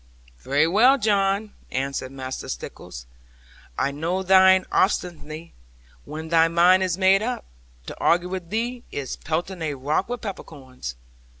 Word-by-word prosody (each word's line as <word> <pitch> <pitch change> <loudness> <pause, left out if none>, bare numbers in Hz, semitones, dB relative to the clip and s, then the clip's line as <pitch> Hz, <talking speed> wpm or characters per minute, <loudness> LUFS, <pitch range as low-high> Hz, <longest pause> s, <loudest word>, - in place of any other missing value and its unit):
'Very 140 +4 +2
well, 225 +11 +5
John,' 205 -2 +1 0.2
answered 135 0 -3
Master 130 -1 -6
Stickles, - - -8 0.7
'I 140 - 0
know 170 +6 -2
thine 190 0 +6
obstinacy. 170 -4 -1 0.5
When 160 +1 -7
thy 165 0 +5
mind 175 +3 +5
is 185 -2 0
made 190 +1 +4
up, 245 +3 -3 0.4
to - - -7
argue 175 +1 +2
with 185 -2 -5
thee 235 +3 -2
is 140 -2 -5
pelting 170 +4 -3
a 150 -3 -2
rock 150 - -1
with 245 0 -4
peppercorns. 130 - -8
175 Hz, 135 wpm, -24 LUFS, 145-195 Hz, 0.7 s, thine